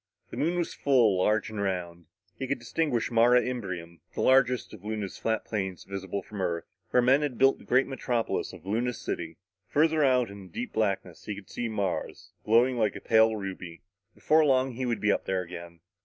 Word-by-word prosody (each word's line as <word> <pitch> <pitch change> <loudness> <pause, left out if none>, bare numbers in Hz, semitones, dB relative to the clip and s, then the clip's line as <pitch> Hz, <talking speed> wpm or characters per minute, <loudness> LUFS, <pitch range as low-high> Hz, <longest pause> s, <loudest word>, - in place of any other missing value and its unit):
The - - -7
Moon 170 +3 0
was 175 - -1
full, 120 -9 +3
large 105 +3 +1
and 105 -2 -4
round. 85 -4 -3 0.3
He 135 - -3
could 140 - 0
distinguish 120 0 -1
Mare 120 +1 +5
Imbrium, 95 -10 -2 0.2
the - - -2
largest 130 -2 +3
of 105 -3 -12
Luna's 105 -2 -4
flat 110 0 -1
plains 95 -4 -3
visible 95 0 -5
from 105 0 -7
Earth, 85 -2 -1 0.2
where 125 - +3
men 135 +4 +5
had 140 -5 -2
built 135 +1 +4
the - - -15
great 130 +2 +3
metropolis 125 -3 -2
of 80 - -13
Luna 115 +5 0
City. 80 -7 -5 0.3
Farther 155 +1 +3
out 125 -5 +3
in 100 -1 -10
the - - -20
deep 120 - -5
blackness, 95 -5 -2
he 105 - -4
could 100 -1 -12
see 120 -1 -3
Mars, 100 -3 -3
glowing 120 +3 +3
like 110 -2 +1
a - - -5
pale 110 0 +4
ruby. 95 -4 -7 0.3
Before 155 +1 +3
long 135 -2 +3
he 125 +1 -3
would 120 -2 -1
be 105 - +3
up - - -1
there 95 -1 -1
again. 85 -1 -10
110 Hz, 200 wpm, -28 LUFS, 95-125 Hz, 0.3 s, Mare